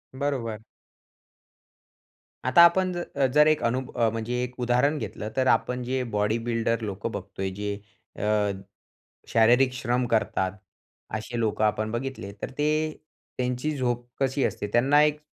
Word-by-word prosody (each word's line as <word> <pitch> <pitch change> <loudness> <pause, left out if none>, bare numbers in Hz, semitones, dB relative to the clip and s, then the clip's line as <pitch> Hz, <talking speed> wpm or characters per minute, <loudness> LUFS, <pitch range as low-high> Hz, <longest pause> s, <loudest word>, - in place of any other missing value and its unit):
बरोबर. 130 -6 -2 1.9
आता 130 +6 +6
आपण 185 +2 +3
जर 145 -6 -1
जर 150 +1 +6
1 155 -1 +3
अनु 120 +2 +1 0.3
म्हणजे 115 +2 -2
1 125 0 -7
उदाहरण 125 +5 +2
घेतलं, 105 -6 -5
तर 130 0 +2
आपण 125 0 +2
जे 130 +1 -1
बॉडीबिल्डर 115 +2 0
लोकं 105 +1 -4
बघतोय, 95 -1 -4
जे 100 +1 -3 0.5
अ, - - -3 1.0
शारीरिक 120 +3 +4
श्रम 125 -1 0
करतात, 110 -4 +1 0.6
असे 115 +2 -4
लोकं 110 -1 0
आपण 110 +1 0
बघितले, 120 -4 -4
तर - - -3
ते 150 - +1 0.7
त्यांची 125 +4 -1
झोप 120 -2 -1
कशी 135 0 +1
असते? 105 - -1
त्यांना 135 +5 +5
एक 150 0 +1
120 Hz, 135 wpm, -26 LUFS, 110-135 Hz, 1.9 s, आता